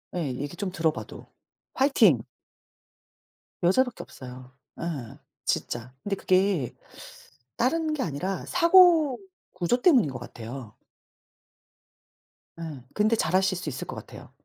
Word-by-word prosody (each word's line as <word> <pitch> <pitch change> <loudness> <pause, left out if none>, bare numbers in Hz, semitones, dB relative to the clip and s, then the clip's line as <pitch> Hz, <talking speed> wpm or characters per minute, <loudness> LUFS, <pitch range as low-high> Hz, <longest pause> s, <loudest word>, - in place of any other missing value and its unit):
예. 175 -3 -1
얘기 145 +5 -5
좀 185 0 -3
들어 160 -2 +1
봐도. - - -9 0.5
화이팅. 225 - +4 1.4
여자밖에 245 +8 +2
없어요. 125 0 -11 0.3
예. 145 -9 -5 0.3
진짜. 120 +1 -2
근데 200 -1 -1
그게 185 - +1 0.8
다른 310 +6 +1
게 295 - -1
아니라 180 +5 -3
사고 340 -5 +6 0.3
구조 180 +7 0
때문인 255 - +5
것 130 - -6
같아요. 115 -1 -9 1.8
예. 155 -7 -7
근데 215 +2 +3
잘 215 - -1
하실 190 0 +2
수 170 -4 -4
있을 130 - -6
것 - - -6
같아요. - - -11
180 Hz, 230 characters per minute, -26 LUFS, -, 1.8 s, 사고